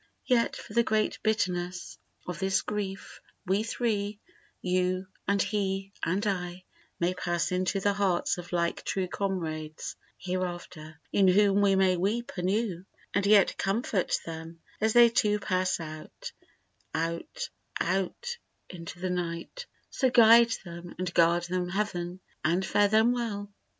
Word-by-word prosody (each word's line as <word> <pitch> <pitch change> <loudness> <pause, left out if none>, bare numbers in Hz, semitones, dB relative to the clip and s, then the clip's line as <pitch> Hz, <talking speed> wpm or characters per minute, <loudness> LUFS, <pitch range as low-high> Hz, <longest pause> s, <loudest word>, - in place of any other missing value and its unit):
Yet 240 -3 +2
for - - -10
the 235 - +5
great 215 -2 0
bitterness 180 -5 -1 0.3
of 180 - -5
this 190 0 +1
grief 200 -2 -5 0.2
We 195 +3 +2
three, 215 -3 -1 0.4
you 185 +1 0 0.2
and 200 0 +2
he 195 -1 -1
and 190 +6 0
I, 180 -2 -2 0.4
May 175 +1 +1
pass 175 -1 -1
into 185 +2 0
the 200 +1 +2
hearts 190 -3 +1
of 175 - -9
like 170 -1 0
true 190 -1 -1
comrades 160 -6 -3 0.2
hereafter, 175 -4 -5
In 195 -1 +5
whom 200 +1 +5
we 200 -1 +4
may 190 -1 +3
weep 215 +7 -1
anew 190 0 -1 0.3
and 200 0 +1
yet 205 -1 +5
comfort 200 -1 0
them, 165 0 -8 0.2
As 220 0 +2
they 240 -1 +8
too 210 -3 +2
pass 185 -2 0
out, 155 -1 -8 0.6
out, 170 - -3 0.3
out 195 - -1 0.3
into 170 -1 -8
the 185 0 -2
night, 180 - -4 0.2
So 260 - +2
guide 235 -1 +7 0.2
them 170 0 -9
and 180 0 -3
guard 170 +1 +4
them 180 0 -2
Heaven 185 -2 -2 0.2
and 175 +4 +2
fare 205 +1 +3
them 220 +3 +4
well! 205 -4 -3
190 Hz, 140 wpm, -29 LUFS, 175-210 Hz, 0.6 s, they